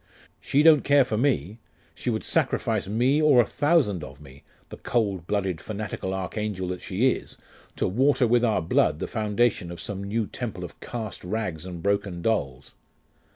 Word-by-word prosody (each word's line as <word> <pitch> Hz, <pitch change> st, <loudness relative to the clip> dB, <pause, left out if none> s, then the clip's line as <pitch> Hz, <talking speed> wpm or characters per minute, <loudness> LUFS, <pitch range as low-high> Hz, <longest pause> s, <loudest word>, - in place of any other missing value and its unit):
She 145 Hz, +2 st, +2 dB
don't 155 Hz, -2 st, +7 dB
care 140 Hz, -2 st, +5 dB
for 110 Hz, -, -2 dB
me; 110 Hz, -, 0 dB, 0.3 s
she -, -, -4 dB
would -, -, -1 dB
sacrifice -, -, 0 dB
me, 125 Hz, +8 st, +2 dB
or 150 Hz, -5 st, +5 dB
a 120 Hz, -, +5 dB
thousand 140 Hz, -, +1 dB
of 70 Hz, -1 st, -10 dB
me, 70 Hz, -2 st, -15 dB, 0.3 s
the -, -, -9 dB
cold 100 Hz, -7 st, -1 dB
blooded 95 Hz, -5 st, -1 dB
fanatical 100 Hz, -3 st, -4 dB
archangel 95 Hz, 0 st, -3 dB
that 90 Hz, 0 st, -4 dB
she 115 Hz, +8 st, +2 dB
is, -, -, -6 dB, 0.4 s
to -, -, 0 dB
water 130 Hz, +6 st, +3 dB
with 120 Hz, +1 st, +3 dB
our 110 Hz, -7 st, +2 dB
blood 75 Hz, -2 st, +2 dB
the -, -, -3 dB
foundation 105 Hz, -3 st, 0 dB
of 85 Hz, -, -7 dB
some 100 Hz, -1 st, -5 dB
new 110 Hz, +3 st, -1 dB
temple 100 Hz, -6 st, -6 dB
of 90 Hz, -, -9 dB
cast 110 Hz, -4 st, -6 dB
rags 90 Hz, -4 st, -3 dB
and 85 Hz, -2 st, -7 dB
broken 100 Hz, -3 st, -1 dB
dolls.... 70 Hz, -, -2 dB
105 Hz, 175 wpm, -25 LUFS, 90-120 Hz, 0.4 s, don't